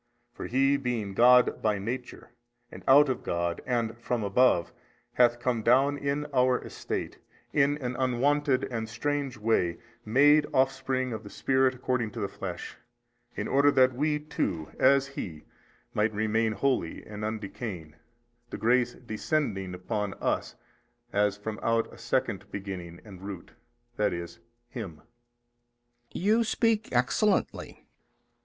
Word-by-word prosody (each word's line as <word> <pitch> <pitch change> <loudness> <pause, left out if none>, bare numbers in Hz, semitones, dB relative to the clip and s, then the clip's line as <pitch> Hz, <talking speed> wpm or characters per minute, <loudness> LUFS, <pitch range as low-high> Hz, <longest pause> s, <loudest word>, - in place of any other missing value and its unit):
For - - -6
He 135 +2 +3
being 120 -7 -3
God 125 +3 +5
by 105 -1 +1
Nature 120 +5 -6 0.4
and - - -10
out 145 +2 +7
of 130 -2 -2
God 85 0 -2
and 120 -3 0
from 120 -1 -2
above, 100 -4 +3 0.4
hath 120 -1 +4
come 120 -2 0
down 135 +5 +4
in 140 +1 -2
our 125 -1 +4
estate, - - -5 0.3
in 145 0 +3
an 125 -3 -4
unwonted 130 +2 +1
and 110 -3 -4
strange 140 +2 -2
way, 105 -6 +1 0.3
MADE 145 +6 +5
offspring 130 -1 +1
of 110 - -5
the 100 - -9
Spirit 130 +2 +1
according 125 -3 -1
to 120 - -6
the 100 - -1
flesh, - - -7 0.6
in - - -3
order 140 +1 +4
that 130 -2 +4
WE 150 +4 +1
too 90 - -3
as 135 +1 +5
He 85 - -7 0.5
might 105 0 +1
remain 110 +1 +1
holy 105 -6 -1
and 105 0 -7
undecaying, 100 -6 -5 0.6
the - - -5
grace 120 +1 +2
descending 110 - -2
upon 100 +1 -3
us - - -2 0.6
as 105 0 +2
from 105 +1 -5
out 115 0 0
a - - -14
second - - -1
beginning 95 -4 -6
and 95 -4 -12
root, 95 -3 -8 0.5
i. 105 - +3
e., 85 -1 -3 0.5
Him. 95 - -7 1.1
B. - - -5
You 215 +5 +3
speak 225 0 +1
excellently. 135 - 0
120 Hz, 140 wpm, -28 LUFS, 105-135 Hz, 1.1 s, out